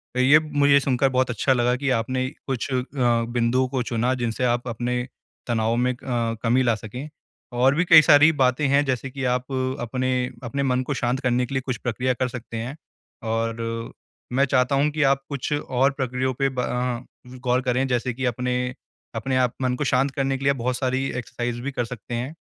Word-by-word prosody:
तो - - 0
ये 140 +4 +6
मुझे 145 -2 +3
सुनकर 135 -1 +1
बहुत 130 -1 +1
अच्छा 125 +3 +1
लगा 125 0 +2
कि 140 +2 -2
आपने 130 +1 0 0.2
कुछ 130 -3 -2
अ, - - +2 0.2
बिंदुओं 120 0 +1
को 130 -1 -2
चुना 120 +2 0
जिनसे 120 0 -2
आप 120 0 0
अपने 125 +2 -2 0.4
तनाव 115 -1 +1
में 125 +1 +1
अ, - - -14 0.5
कमी 125 +3 +3
ला 120 -2 +2
सकें, 115 +7 -7 0.4
और 125 +3 +3
भी 175 +4 +2
कई 165 -3 +9
सारी 155 0 +6
बातें 135 0 +2
हैं 140 +1 +3
जैसे 130 0 -2
कि 135 0 -6
आप 125 +1 -1 0.3
अपने 130 +2 -2 0.3
अपने 140 +4 -2
मन 130 -1 +1
को 145 - -2
शांत 125 0 -1
करने 125 -2 +1
के 130 - -8
लिए 130 - 0
कुछ 130 -3 -2
प्रक्रिया 125 +2 -1
कर 130 +1 -1
सकते 120 -2 -7
हैं। 120 +5 -4 0.5
और 115 0 -3 0.4
मैं 135 +2 +3
चाहता 130 0 +2
हूँ 140 +2 +3
कि 155 0 0
आप 135 0 +3
कुछ 140 -2 -4
और 135 -2 +1
प्रक्रियाओं 130 -1 -2
पे 135 0 +2
ब 130 - -6
अ, 125 0 -2 0.4
गौर 125 +1 +2
करें, 130 +1 0
जैसे 125 0 -1
कि 130 +2 -3
अपने 125 +1 -1 0.4
अपने 130 +4 -1
आप 125 -2 +2
मन 125 -1 +1
को 145 - -2
शांत 135 0 +2
करने 135 0 -1
के 135 - -8
लिए 140 - +4
आप 140 - -3
बहुत 125 +1 -1
सारी 130 +1 0
एक्सरसाइज़ 120 0 -4
भी 140 - -3
कर 120 -3 -2
सकते 120 0 -8
हैं, 130 +6 -4
125 Hz, 210 wpm, -23 LUFS, 120-135 Hz, 0.5 s, कई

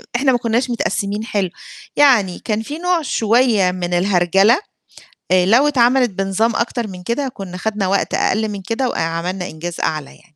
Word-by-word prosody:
إحنا 265 +2 +3
ما 245 - +2
كُنّاش 240 +2 -1
متقسِّمين 205 -2 -2
حلو، 200 -5 -1 0.5
يعني 235 -11 +4
كان 215 -1 -1
في 290 +7 -6
نوع 355 0 0
شوية 225 -6 +2
من 180 -1 -4
الهرجَلة، 190 +4 +3 0.8
آآ 180 -1 +4
لو 245 +9 +4
اتعملت 250 -2 +3
بنظام 195 +4 0
أكتر 235 0 -1
من 180 -2 -9
كده، 250 +8 -2
كُنّا 195 -6 -8
خدنا 210 0 -2
وقت 200 +1 0
أقل 220 0 +1
من 200 -2 -6
كده 235 +5 -1
وأ - - -4
عملنا 170 +3 -2
إنجاز 165 +1 -7
أعلى 155 -3 -1
يعني. - - -18
210 Hz, 175 wpm, -18 LUFS, 185-240 Hz, 0.8 s, يعني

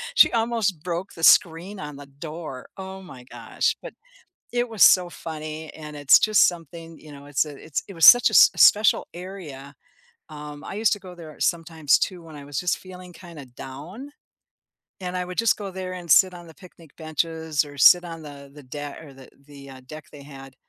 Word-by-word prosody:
she - - +6
almost 225 -8 -1
broke 180 +2 -5
the 165 - -11
screen 175 +5 +3
on 150 -1 -8
the 145 0 -11
door. 150 -1 -9
Oh 190 0 -8
my 130 -9 -13
gosh, - - -3
but - - -10 0.6
it 245 0 0
was 220 -4 -1
so 180 -2 +6
funny, 155 -1 -8
and 150 -1 -10
it's 145 -1 +5
just 215 -1 +4
something, 165 -1 -9
you 150 -1 -14
know 140 0 -13
it's 145 +1 0
a 150 -2 -10
it's 155 - -3
it 195 - -10
was 165 -2 +4
such 245 0 +8
a - - -10
s - - +7
special 210 +1 +4
area, 160 -7 -10 0.5
um, 150 -1 -10
I - - -8
used 220 +1 +1
to 205 - -11
go 185 -2 -12
there 160 -3 -13
sometimes 160 -3 +1
too 180 -2 -4
when 160 -2 -13
I 145 - -11
was 140 -2 -6
just 180 - -1
feeling 180 -1 -13
kinda 170 -5 -12
down, 150 - -11 0.9
and 180 -1 -5
I 180 - -2
would 180 +2 -9
just 230 0 +2
go 200 -2 -7
there 185 0 -6
and 175 -2 -10
sit 185 +3 +5
on 175 -1 -12
the 160 - -15
picnic 170 -5 -17
benches 160 -1 -2
or 145 -1 -13
sit 175 +6 +7
on 165 -1 -9
the 140 -2 -12
the 145 - -13
deck 145 +3 -8
or 145 -3 -13
the 130 -1 -15 0.2
the, 140 -1 -13
uh, 130 -1 -12
deck 155 +1 -10
they 145 - -12
had 135 -2 -13
165 Hz, 210 wpm, -23 LUFS, 145-180 Hz, 0.9 s, such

